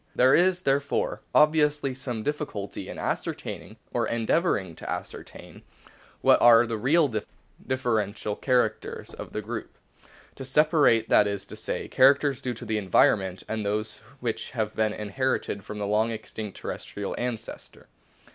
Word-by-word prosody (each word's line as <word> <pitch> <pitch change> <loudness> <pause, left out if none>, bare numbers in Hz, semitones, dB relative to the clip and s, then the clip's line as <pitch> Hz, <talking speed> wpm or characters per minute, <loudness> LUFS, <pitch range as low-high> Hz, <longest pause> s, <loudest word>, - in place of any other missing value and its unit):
There 130 +2 +5
is, 180 0 +4
therefore, 140 -2 0
obviously 150 -3 +3
some 125 -4 -5
diffi 150 +2 -2
culty 100 -1 -6
in - - -7
ascertaining, - - -4 0.2
or - - 0
endeavouring 115 - 0
to - - -8
ascertain, - - -7 0.6
what - - +5
are 120 0 +7
the 115 -1 -3
real 150 +7 +4 0.6
differential 110 -5 -1
characters 125 -4 -1
of - - -8
the 105 - -4
group; 110 +1 -6 0.6
to 135 - -8
separate, 135 -4 +3
that 105 - +5
is 100 -1 -3
to. - - -9
say, - - -4
characters 135 0 +4
due 125 -2 -3
to - - -9
the 110 -1 -1
environment 95 -1 +2
and 110 -1 -3
those 105 +1 -2 0.2
which 115 -3 -3
have 110 -1 -1
been 110 -1 +1
inherited 105 -1 -2
from 105 - -7
the 105 - -2
long 105 +3 +2
extinct 110 -2 -6
terrestrial 100 -1 -5
ancestor. 120 -2 -6
115 Hz, 145 wpm, -26 LUFS, 105-135 Hz, 0.6 s, are